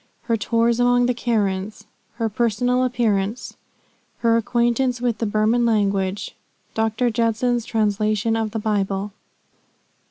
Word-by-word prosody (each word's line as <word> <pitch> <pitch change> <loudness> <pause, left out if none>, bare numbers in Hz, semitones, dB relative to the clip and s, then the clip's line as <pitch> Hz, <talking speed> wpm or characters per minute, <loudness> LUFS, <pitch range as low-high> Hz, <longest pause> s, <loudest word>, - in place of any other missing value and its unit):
HER 230 - 0
TOURS 230 +2 +1
AMONG 245 0 +3
THE 250 - +1
KARENS. 210 -3 -2 0.3
HER 230 -1 -2
PERSONAL 240 +3 +1
APPEARANCE. 225 -3 -1 0.6
HER 230 -1 +2
ACQUAINTANCE 240 +2 +1
WITH 240 -3 -1
THE 225 - -1
BURMAN 215 +3 +2
LANGUAGE. 200 -3 0 0.4
DR. 225 +2 0
JUDSON'S 230 +1 0
TRANSLATION 215 0 0
OF 225 -1 -1
THE 225 - -5
BIBLE. 205 -2 -1
225 Hz, 120 wpm, -22 LUFS, 210-240 Hz, 0.6 s, AMONG